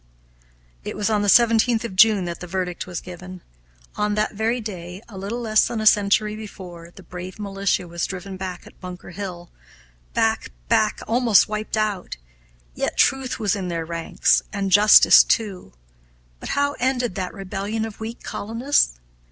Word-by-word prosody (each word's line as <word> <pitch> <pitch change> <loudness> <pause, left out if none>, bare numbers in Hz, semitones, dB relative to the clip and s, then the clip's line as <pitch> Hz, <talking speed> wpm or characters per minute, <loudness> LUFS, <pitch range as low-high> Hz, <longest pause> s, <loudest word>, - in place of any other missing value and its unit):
It - - -6
was 210 +1 0
on 210 -1 +2
the 205 - -1
17th 230 +1 +4
of 225 -5 -6
June 205 -1 +5
that 170 -1 -5
the 180 - -8
verdict 180 0 -3
was 180 -2 -5
given. 180 0 -10 0.5
On 210 0 0
that 215 +1 0
very 225 +4 0
day, 180 -5 -7
a 215 - -13
little 200 +5 -4
less 215 -3 +3
than 235 - -3
a 215 - -3
century 210 0 +3
before, 180 -6 -10
the 190 - -13
brave 180 +2 -8
militia 195 -3 -1
was 170 0 -3
driven 190 +1 -7
back 185 -1 -6
at - - -17
Bunker 180 -1 -9
Hill 175 -3 -7 0.6
back, - - +1 0.2
back, 215 - +2
almost 230 -2 +4
wiped 215 +1 -3
out; 210 - -2 0.6
yet - - -3
truth 265 -1 +2
was 215 -1 0
in 190 -3 -4
their 165 -2 -3
ranks, 165 0 +1
and 200 -2 -2
justice, 205 +2 +8
too. 195 - -2 0.7
But - - -7
how 285 0 +2
ended 250 -3 0
that 185 +1 -5
rebellion 200 +3 -3
of 220 -2 -9
weak 225 +1 -7
colonists? 230 - 0
200 Hz, 170 wpm, -22 LUFS, 180-220 Hz, 0.7 s, justice